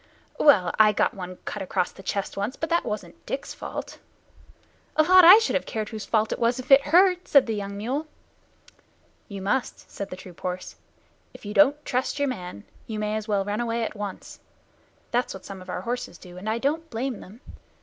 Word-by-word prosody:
"Well, 195 Hz, -, +5 dB
I 215 Hz, -1 st, +7 dB
got -, -, +1 dB
one 185 Hz, -1 st, -7 dB
cut 205 Hz, -, -5 dB
across 180 Hz, -1 st, -1 dB
the -, -, -13 dB
chest 195 Hz, +1 st, -3 dB
once, 205 Hz, +6 st, -3 dB
but 320 Hz, -, -4 dB
that 340 Hz, -, +3 dB
wasn't 210 Hz, -, -6 dB
Dick's -, -, -4 dB
fault -, -, -7 dB, 0.5 s
" -, -, -35 dB, 0.2 s
"A 310 Hz, -, +5 dB
lot 370 Hz, +3 st, +7 dB
I 360 Hz, +5 st, +11 dB
should 450 Hz, +1 st, 0 dB
have -, -, -1 dB
cared 215 Hz, -1 st, -3 dB
whose 215 Hz, -3 st, -6 dB
fault 220 Hz, -1 st, +1 dB
it -, -, -2 dB
was, 235 Hz, +1 st, +2 dB
if 255 Hz, +2 st, -7 dB
it 270 Hz, +1 st, +9 dB
hurt!" 360 Hz, +3 st, +4 dB
said 280 Hz, -3 st, +6 dB
the 225 Hz, -, -2 dB
young 200 Hz, -1 st, -5 dB
mule. 265 Hz, +9 st, -3 dB, 1.2 s
"You 200 Hz, -3 st, -7 dB
must," 225 Hz, +6 st, -2 dB
said 200 Hz, -1 st, -6 dB
the -, -, -6 dB
troop 185 Hz, -2 st, -13 dB
horse. 180 Hz, 0 st, -5 dB, 0.6 s
"If -, -, -13 dB
you 205 Hz, -, -5 dB
don't 295 Hz, +3 st, +4 dB
trust 255 Hz, +3 st, -1 dB
your 285 Hz, -1 st, +1 dB
man, 180 Hz, -, -6 dB, 0.2 s
you 220 Hz, -, -4 dB
may 210 Hz, 0 st, -1 dB
as 215 Hz, 0 st, -4 dB
well 200 Hz, -2 st, 0 dB
run 205 Hz, +3 st, -2 dB
away 235 Hz, 0 st, -1 dB
at -, -, -3 dB
once. 205 Hz, -2 st, -7 dB, 0.7 s
That's 245 Hz, -3 st, 0 dB
what 190 Hz, -, -11 dB
some 195 Hz, -1 st, -8 dB
of 185 Hz, -, -12 dB
our 180 Hz, -, -3 dB
horses 240 Hz, -4 st, -4 dB
do, 180 Hz, -1 st, -13 dB
and 190 Hz, +4 st, -5 dB
I 220 Hz, -, 0 dB
don't 310 Hz, +6 st, -1 dB
blame 245 Hz, 0 st, -3 dB
them. 215 Hz, +7 st, -13 dB
220 Hz, 215 wpm, -25 LUFS, 195-270 Hz, 1.2 s, I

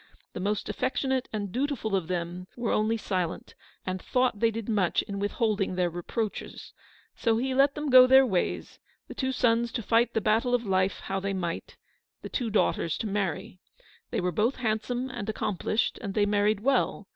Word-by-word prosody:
The -, -, -5 dB
most 205 Hz, +2 st, -1 dB
affectionate 260 Hz, 0 st, -1 dB
and 205 Hz, -3 st, -3 dB
dutiful 255 Hz, -4 st, -1 dB
of 185 Hz, -4 st, -1 dB
them 175 Hz, 0 st, -4 dB
were 240 Hz, -2 st, -1 dB
only 215 Hz, +2 st, +1 dB
silent, 185 Hz, -5 st, -3 dB, 0.3 s
and 185 Hz, 0 st, -3 dB
thought 250 Hz, -4 st, +1 dB
they 230 Hz, -, +4 dB
did 225 Hz, -1 st, -5 dB
much 205 Hz, -6 st, +1 dB
in 200 Hz, -1 st, -5 dB
withholding 205 Hz, -2 st, 0 dB
their 180 Hz, -1 st, +1 dB
reproaches. 200 Hz, +5 st, -5 dB, 0.4 s
So 225 Hz, -2 st, +1 dB
he 260 Hz, +3 st, -1 dB
let 275 Hz, +2 st, +4 dB
them 295 Hz, -2 st, -2 dB
go 255 Hz, 0 st, +9 dB
their 265 Hz, +1 st, +7 dB
ways, 190 Hz, -7 st, -2 dB, 0.3 s
the -, -, -8 dB
two 260 Hz, -1 st, -1 dB
sons 235 Hz, -2 st, +2 dB
to 235 Hz, -, -3 dB
fight 230 Hz, +3 st, +2 dB
the -, -, +3 dB
battle 225 Hz, +4 st, +2 dB
of 240 Hz, -1 st, -2 dB
life 190 Hz, -1 st, +1 dB
how 195 Hz, 0 st, -3 dB
they 195 Hz, +1 st, -2 dB
might 175 Hz, -3 st, -4 dB, 0.2 s
— -, -, -59 dB
the -, -, -6 dB
two 245 Hz, -4 st, -2 dB
daughters 185 Hz, -5 st, +1 dB
to -, -, -4 dB
marry. 195 Hz, 0 st, -3 dB, 0.5 s
They -, -, -1 dB
were 180 Hz, 0 st, 0 dB
both 220 Hz, -, +1 dB
handsome 245 Hz, +2 st, -2 dB
and 210 Hz, -4 st, -5 dB
ac 220 Hz, -, -2 dB
complished, 215 Hz, +3 st, -1 dB
and 200 Hz, -4 st, -5 dB
they 210 Hz, -2 st, +3 dB
married 205 Hz, 0 st, +2 dB
well. 250 Hz, -5 st, +1 dB
215 Hz, 190 wpm, -28 LUFS, 195-245 Hz, 0.5 s, go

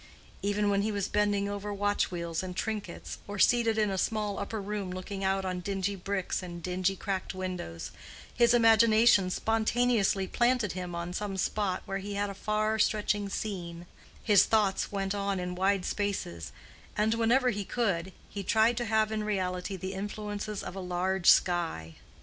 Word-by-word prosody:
Even 205 Hz, 0 st, +1 dB
when 200 Hz, 0 st, +2 dB
he 215 Hz, +2 st, 0 dB
was 200 Hz, -2 st, -1 dB
bending 205 Hz, -1 st, +1 dB
over 205 Hz, 0 st, -4 dB
watch 205 Hz, 0 st, 0 dB
wheels 170 Hz, -2 st, -3 dB
and 185 Hz, -1 st, -6 dB
trinkets, 210 Hz, -3 st, -4 dB
or 205 Hz, 0 st, -5 dB
seated 230 Hz, +1 st, +4 dB
in 210 Hz, -2 st, +2 dB
a 190 Hz, -, -1 dB
small 210 Hz, -1 st, -1 dB
upper 220 Hz, -, -4 dB
room 200 Hz, -1 st, -4 dB
looking 195 Hz, +2 st, -5 dB
out 190 Hz, 0 st, +1 dB
on 185 Hz, -1 st, -2 dB
dingy 195 Hz, +1 st, -2 dB
bricks 195 Hz, 0 st, -2 dB
and 175 Hz, -2 st, -8 dB
dingy 185 Hz, +1 st, 0 dB
cracked 190 Hz, 0 st, -3 dB
windows, 180 Hz, -, -5 dB, 0.4 s
his 235 Hz, 0 st, +4 dB
imagination 225 Hz, -3 st, +5 dB
spontaneously 225 Hz, -1 st, +1 dB
planted 240 Hz, -1 st, +1 dB
him 180 Hz, -1 st, -5 dB
on 170 Hz, +1 st, -4 dB
some 195 Hz, 0 st, -3 dB
spot 190 Hz, -1 st, -1 dB
where 195 Hz, 0 st, -3 dB
he 200 Hz, +1 st, -5 dB
had 205 Hz, 0 st, -1 dB
a -, -, -6 dB
far 215 Hz, +2 st, 0 dB
stretching 210 Hz, -1 st, +1 dB
scene; 175 Hz, -5 st, -5 dB, 0.4 s
his 205 Hz, -3 st, +6 dB
thoughts 210 Hz, -3 st, +1 dB
went 195 Hz, -1 st, -1 dB
on 200 Hz, -1 st, -1 dB
in 180 Hz, 0 st, -3 dB
wide 190 Hz, +1 st, +1 dB
spaces; 190 Hz, -, -3 dB, 0.5 s
and 215 Hz, +1 st, +2 dB
whenever 240 Hz, +3 st, +3 dB
he 205 Hz, -1 st, -3 dB
could, 190 Hz, -5 st, -1 dB, 0.2 s
he 200 Hz, -, -6 dB
tried 220 Hz, +4 st, +3 dB
to 240 Hz, -, -1 dB
have 220 Hz, 0 st, +2 dB
in 215 Hz, -1 st, -1 dB
reality 190 Hz, -2 st, -2 dB
the 190 Hz, +1 st, -5 dB
influences 205 Hz, +1 st, -4 dB
of -, -, -7 dB
a -, -, -5 dB
large 185 Hz, 0 st, +1 dB
sky. 165 Hz, -, +2 dB
200 Hz, 175 wpm, -29 LUFS, 185-215 Hz, 0.5 s, his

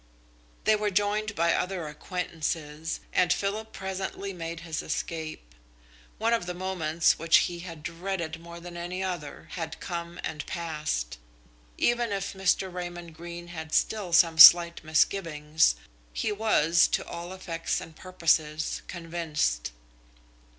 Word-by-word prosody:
They 215 Hz, -, +4 dB
were 210 Hz, 0 st, 0 dB
joined 205 Hz, +2 st, 0 dB
by 170 Hz, +1 st, +3 dB
other 180 Hz, -4 st, -2 dB
acquaintances, 160 Hz, -1 st, -4 dB
and 180 Hz, -1 st, +3 dB
Philip 215 Hz, +2 st, -1 dB
presently 190 Hz, +1 st, -4 dB
made 170 Hz, -1 st, -6 dB
his 165 Hz, -2 st, -4 dB
escape. 155 Hz, -, -5 dB, 0.6 s
One 225 Hz, +2 st, +1 dB
of 225 Hz, -6 st, 0 dB
the 180 Hz, -, -3 dB
moments 170 Hz, -3 st, +1 dB
which 165 Hz, +1 st, +5 dB
he 175 Hz, -1 st, -5 dB
had 165 Hz, -3 st, -9 dB
dreaded 170 Hz, -1 st, -4 dB
more 170 Hz, 0 st, -10 dB
than 175 Hz, 0 st, -9 dB
any 175 Hz, +2 st, -4 dB
other 175 Hz, -6 st, -5 dB
had 160 Hz, -2 st, -5 dB
come 170 Hz, -1 st, -5 dB
and 150 Hz, -1 st, -4 dB
passed. 150 Hz, -, -3 dB, 0.6 s
Even 240 Hz, -2 st, +1 dB
if 195 Hz, 0 st, -2 dB
Mr. 190 Hz, -1 st, +1 dB
Raymond 175 Hz, -2 st, -6 dB
Greene 170 Hz, +1 st, -8 dB
had 160 Hz, -2 st, -5 dB
still 205 Hz, -5 st, +1 dB
some 165 Hz, -1 st, +5 dB
slight 170 Hz, +1 st, +10 dB
misgivings, 155 Hz, -, +2 dB, 0.4 s
he 210 Hz, -, -1 dB
was, 175 Hz, -6 st, +4 dB
to -, -, -1 dB
all 170 Hz, +1 st, -7 dB
effects 175 Hz, -3 st, -3 dB
and 160 Hz, -, -10 dB
purposes, 155 Hz, -4 st, 0 dB
convinced. 165 Hz, -, -2 dB
170 Hz, 135 wpm, -28 LUFS, 160-190 Hz, 0.6 s, slight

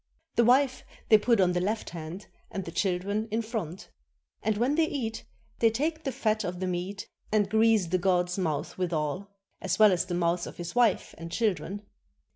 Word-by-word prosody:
The 235 Hz, -, +5 dB
wife 260 Hz, +2 st, +3 dB, 0.3 s
they 215 Hz, -, +8 dB
put 230 Hz, 0 st, +3 dB
on 180 Hz, -2 st, +4 dB
the 180 Hz, 0 st, 0 dB
left 215 Hz, +4 st, -2 dB
hand 170 Hz, +3 st, -7 dB, 0.2 s
and 195 Hz, -, -5 dB
the 165 Hz, -, -6 dB
children 195 Hz, +4 st, -1 dB
in 225 Hz, +2 st, -1 dB
front. 205 Hz, -6 st, -5 dB, 0.5 s
And 220 Hz, -1 st, 0 dB
when 245 Hz, +6 st, +2 dB
they 320 Hz, +1 st, +3 dB
eat, 235 Hz, -7 st, -4 dB, 0.3 s
they 230 Hz, -, +5 dB
take 310 Hz, +8 st, -2 dB
the 270 Hz, -, 0 dB
fat 220 Hz, -4 st, 0 dB
of 180 Hz, -1 st, -4 dB
the 185 Hz, -, -1 dB
meat 185 Hz, +2 st, -3 dB, 0.2 s
and 210 Hz, -2 st, +3 dB
grease 220 Hz, -1 st, +4 dB
the 180 Hz, +2 st, 0 dB
god's 180 Hz, -1 st, +1 dB
mouth 160 Hz, -3 st, -2 dB
withal, 175 Hz, +2 st, -2 dB, 0.3 s
as 185 Hz, -2 st, -1 dB
well 215 Hz, -2 st, +7 dB
as 180 Hz, -2 st, +1 dB
the 180 Hz, -1 st, -3 dB
mouths 170 Hz, 0 st, 0 dB
of -, -, -10 dB
his 175 Hz, -1 st, -5 dB
wife 240 Hz, -4 st, +2 dB
and 165 Hz, 0 st, -7 dB
children. 205 Hz, -2 st, -1 dB
200 Hz, 195 wpm, -28 LUFS, 180-225 Hz, 0.5 s, they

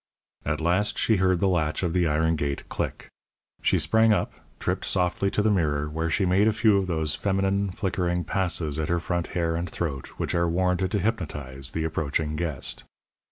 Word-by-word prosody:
At 75 Hz, +1 st, 0 dB
last 95 Hz, +6 st, +1 dB
she 110 Hz, -, +3 dB
heard 95 Hz, -1 st, +2 dB
the 100 Hz, -, +3 dB
latch 80 Hz, -3 st, 0 dB
of 85 Hz, -2 st, 0 dB
the 90 Hz, -2 st, +2 dB
iron 80 Hz, +2 st, +2 dB
gate 70 Hz, -2 st, -3 dB
click. -, -, -4 dB, 0.5 s
She -, -, +3 dB
sprang 110 Hz, 0 st, +4 dB
up, 105 Hz, -, +1 dB, 0.3 s
tripped -, -, -1 dB
softly 90 Hz, +1 st, +1 dB
to 105 Hz, -, 0 dB
the 110 Hz, -, +3 dB
mirror, 75 Hz, -6 st, +1 dB
where 80 Hz, +2 st, -2 dB
she 95 Hz, +4 st, +1 dB
made 95 Hz, +4 st, +3 dB
a -, -, +5 dB
few 110 Hz, -2 st, +4 dB
of 95 Hz, -, -2 dB
those 80 Hz, -3 st, 0 dB
feminine, 95 Hz, +2 st, 0 dB
flickering 90 Hz, -2 st, -1 dB
passes 85 Hz, -4 st, -1 dB
at 75 Hz, -, -2 dB
her 85 Hz, 0 st, +2 dB
front 85 Hz, 0 st, -2 dB
hair 85 Hz, -1 st, +1 dB
and 85 Hz, +1 st, -3 dB
throat 75 Hz, -6 st, -3 dB
which -, -, -2 dB
are 85 Hz, 0 st, +2 dB
warranted 90 Hz, +2 st, +1 dB
to 105 Hz, -, +2 dB
hypnotize 75 Hz, -, -1 dB
the 80 Hz, +1 st, -3 dB
approaching 75 Hz, -1 st, -1 dB
guest. 75 Hz, -5 st, -2 dB
85 Hz, 195 wpm, -26 LUFS, 80-95 Hz, 0.5 s, a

